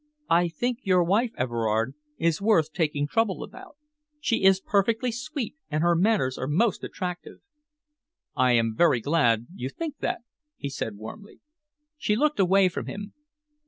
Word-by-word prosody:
I 175 +1 +4
think 240 +9 -2
your 185 -5 +3
wife, 210 +8 +2
Everard, 115 -1 0 0.2
is 165 +1 +1
worth 165 -8 +3
taking 150 -4 0
trouble 205 +5 0
about. 375 -6 -12 0.4
She 230 -8 0
is 190 0 +6
perfectly 225 +5 +1
sweet, 270 0 -5
and 155 +1 0
her 175 0 +4
manners 175 -8 +1
are 130 - -2
most 190 +8 +1
attractive." 180 -2 -5 1.0
"I 125 -1 +3
am 115 -1 +2
very 155 -6 +4
glad 120 -5 +2
you 130 -8 -5
think 300 - -6
that," - - -2 0.4
he 140 - -4
said 110 -5 -4
warmly. 110 - -10 0.6
She 210 - +1
looked 300 +3 +1
away 190 0 +5
from 180 - -4
him. 205 0 -7
180 Hz, 155 wpm, -26 LUFS, 140-220 Hz, 1.0 s, is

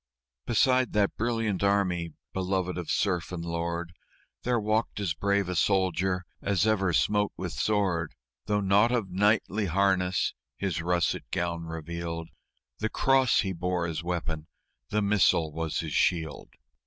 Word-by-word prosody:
Beside 125 +2 +3
that 105 -2 +2
brilliant 115 -4 -1
army, 90 -5 +1 0.2
beloved 95 -1 -1
of 90 -2 -5
serf 90 -5 0
and 85 -2 -4
lord, 85 0 -3 0.5
There 120 -1 +1
walked 110 +1 0
as 95 -6 0
brave 100 +3 +1
a 90 - -2
soldier 95 0 +1 0.2
as 100 0 +1
ever 100 -4 +2
smote 105 +4 +2
with 90 -2 -4
sword, 90 -3 0 0.3
Though 105 0 +1
nought 100 +4 +4
of 115 -7 -1
knightly 105 +1 +2
harness 95 0 +1 0.2
his 90 -5 -2
russet 85 0 0
gown 85 -1 -2
revealed 85 +1 -5 0.5
The 110 - -1
cross 135 0 +3
he 95 -2 -2
bore 90 0 -1
as 80 -2 -3
weapon, 80 -3 -3 0.4
the 105 0 +1
missal 95 -6 +3
was 80 0 -2
his - - -5
shield. 80 -4 0
95 Hz, 140 wpm, -28 LUFS, 85-105 Hz, 0.5 s, nought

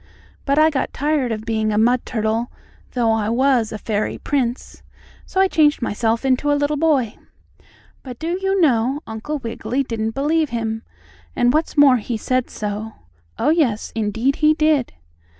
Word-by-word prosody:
But 280 +1 +1
I 310 +1 +5
got 270 - -2
tired 290 -4 0
of 215 0 -4
being 220 -1 0
a 210 - 0
mud 240 +3 +2
turtle, 225 0 -1 0.4
though 235 -3 +2
I 220 -1 0
was 245 -2 +2
a 215 - -4
fairy 215 0 -2
prince, 255 -4 -3 0.5
so 380 - -2
I 385 - +5
changed 305 -4 +3
myself 230 +2 -1
into 265 +2 +2
a 290 - +3
little 290 +1 0
boy." 280 -8 +1 0.8
But, 250 -3 -9
do 340 +6 -3
you 385 0 +1
know, 265 -2 +2
Uncle 225 +8 -5
Wiggily 255 +2 -3
didn't 225 -3 -3
believe 305 +2 +1
him, 225 -1 -3 0.5
and, 245 +1 +3
what's 310 +1 -1
more, 280 -3 +7
he 230 +1 -4
said 255 +3 -1
so. 210 +1 -5 0.4
Oh, - - +1
yes, 285 -10 +1
indeed 225 +5 0
he 310 0 +4
did! 305 -4 +2
250 Hz, 170 wpm, -20 LUFS, 225-295 Hz, 0.8 s, more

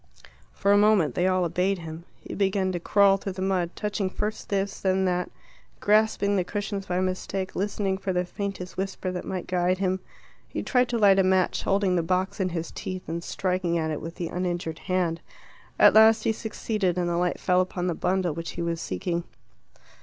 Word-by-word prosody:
For 200 - +1
a 205 - +6
moment 205 - +4
they 175 +7 +1
all 185 -1 +2
obeyed 180 +4 0
him. 165 0 -8 0.2
He - - -8
began 190 -1 +1
to 175 - -2
crawl 195 +2 +4
through 195 0 -5
the 185 0 -4
mud, 185 -3 +1
touching 205 -2 -2
first 210 +3 -4
this, 195 0 -1
then 190 0 +1
that, 180 -1 0 0.5
grasping 210 -1 +3
the 185 - +2
cushions 200 +1 -4
by 180 0 0
mistake, 185 +1 -3
listening 195 -1 -1
for 195 - -2
the 180 0 0
faintest 190 -1 -5
whisper 190 -1 -3
that 180 - -5
might 185 -2 -4
guide 180 0 +1
him. 190 0 0 0.5
He - - -4
tried 250 -2 +2
to 240 - 0
light 200 -3 +5
a - - +5
match, 185 -1 +2
holding 195 -2 +1
the - - +2
box 185 +4 -1
in 185 -1 +1
his 165 -1 -4
teeth 185 -1 -6
and 170 +1 -4
striking 180 -2 -1
at 160 -1 -1
it 150 - -3
with 165 +1 -7
the 170 -2 -4
uninjured 175 -3 -3
hand. 175 -3 0 0.6
At - - +7
last 220 0 +6
he - - +2
succeeded, 215 -4 -2
and 175 -1 0
the 170 - 0
light 180 0 0
fell 180 0 +3
upon 180 -1 -3
the 180 - 0
bundle 180 0 0
which 165 +2 -5
he 170 - -4
was 170 -1 -2
seeking. 175 -3 -2
185 Hz, 205 wpm, -26 LUFS, 175-195 Hz, 0.6 s, At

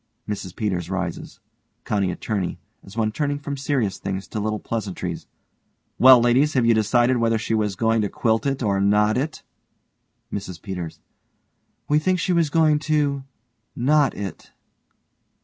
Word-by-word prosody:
MRS 100 -3 -5
PETERS 90 -5 -2
rises.) 95 -3 -4 0.5
COUNTY 100 -3 0
ATTORNEY: 95 +1 -3 0.3
(as 100 +3 -13
one 110 -1 +1
turning 145 +3 -1
from 145 0 -5
serious 130 -8 -1
things 95 -1 -4
to 110 - -4
little 110 +1 -1
pleasantries) 95 -6 -4 0.7
Well 130 0 +9
ladies, 125 +6 +3
have 125 -3 +3
you 115 - +5
decided 120 +3 +3
whether 115 -1 +2
she 115 0 -3
was 105 -3 0
going 115 +2 +2
to 105 - -1
quilt 110 +6 0
it 135 -2 -1
or 100 -2 +1
knot 105 +2 +3
it? 150 +5 -3 0.9
MRS 95 -4 -5
PETERS: 90 -5 -6 0.9
We 150 +1 +3
think 185 +4 +1
she 180 +1 0
was 170 -3 +2
going 155 -1 +3
to 145 -3 0 0.5
knot 145 +3 +2
it. 95 -5 -7
110 Hz, 150 wpm, -23 LUFS, 100-140 Hz, 0.9 s, Well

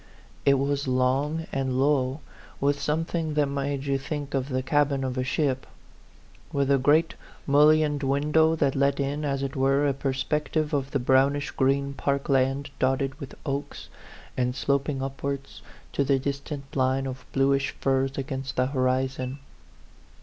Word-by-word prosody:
It 140 - +7
was 140 +1 -1
long 135 +5 +1
and 130 -1 -1
low, 135 0 +1 0.4
with 140 +1 +1
something 160 +1 -1
that 150 -1 +3
made 140 0 -2
you 135 -1 0
think 145 +1 -5
of 135 0 -1
the 130 -1 -1
cabin 140 0 +1
of 130 -1 -2
a 130 - 0
ship, 130 0 -1 0.8
with 140 -1 +1
a 140 - +4
great 155 +5 +3 0.3
mullioned 150 +1 +4
window 150 +4 +3
that 140 -4 +1
let 140 +1 +2
in, 140 +2 -1
as 140 -2 -1
it 135 - -4
were, 135 +2 +2
a 140 - +2
perspective 150 +3 -1
of 140 -2 0
the 140 - 0
brownish 135 +3 +2
green 140 +1 +1
park 140 +1 -1
land, 135 +1 +1
dotted 135 +2 0
with 140 -3 -8
A - - -11
PHANTOM 140 - 0
LOVER 140 +1 -2
59 - - -27
oaks, - - -11 0.5
and 125 0 0
sloping 140 0 0
upwards 140 0 -5 0.3
to 140 - +1
the 135 0 +2
distant 140 +1 -5
line 130 0 +1
of 130 -1 -6
bluish 135 0 +2
firs 135 0 0
against 135 0 -4
the 125 - +2
horizon. 130 0 -1
140 Hz, 165 wpm, -26 LUFS, 135-145 Hz, 0.8 s, It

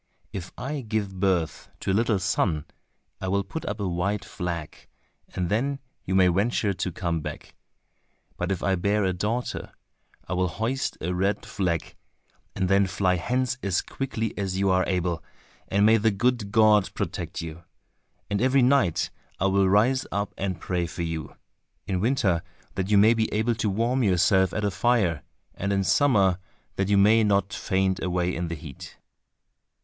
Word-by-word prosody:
If 95 -2 -6
I 140 +5 -3
give 105 -4 -3
birth 90 -4 0
to - - -1
a - - +2
little 110 0 +2
son, 85 -4 0 0.6
I 95 - -3
will 100 +1 +1
put 155 +12 -6
up 105 +2 -3
a 100 - -1
white 95 +4 -1
flag, 85 -3 -5 0.5
and 90 -1 -1
then 130 +9 0 0.3
you 95 - -1
may 95 -1 +6
venture 100 +3 +1
to 90 0 -3
come 85 -2 -2
back, - - -7 0.8
but 90 +2 -2
if 95 - -2
I 95 - +2
bear 100 +3 +1
a 95 -1 +1
daughter, 110 +7 -3 0.6
I 90 - -3
will 90 0 +1
hoist 115 +10 -2
a 90 +3 -1
red 100 +3 0
flag, 90 -5 -2 0.6
and 95 -1 0
then 100 +1 +4
fly 90 -1 +1
hence 130 +7 -1
as 95 -3 0
quickly 115 -5 -3
as 95 -2 -2
you 95 0 +2
are 95 0 +3
able, 90 -3 -1 0.4
and 100 +1 +3
may 110 +1 +6
the 110 +1 +3
good 110 0 0
God 105 -2 +5
protect - - -4
you. 85 0 -7 0.6
And 100 0 -1
every 130 +1 +4
night 125 - +2 0.3
I 95 - +1
will 95 0 +3
rise 120 +7 +3
up 100 0 -2
and 95 -3 -3
pray 90 0 -1
for 85 - -5
you—in 80 +3 -6
winter 105 -8 +2 0.3
that 95 0 -2
you 105 - +5
may 110 +3 +6
be 110 -1 0
able 110 +3 +1
to 110 -1 -1
warm 115 +6 +1
yourself 95 -2 +3
at 105 - -2
a 100 - +1
fire, 100 -8 +1 0.3
and 100 +1 -3
in 100 -1 +1
summer 95 - +3 0.4
that 95 0 -1
you 100 - +4
may 110 +3 +5
not 100 -2 +1
faint 95 0 0
away 90 0 0
in 85 0 -2
the 85 - -4
heat." 70 -3 -10
100 Hz, 175 wpm, -26 LUFS, 90-110 Hz, 0.8 s, may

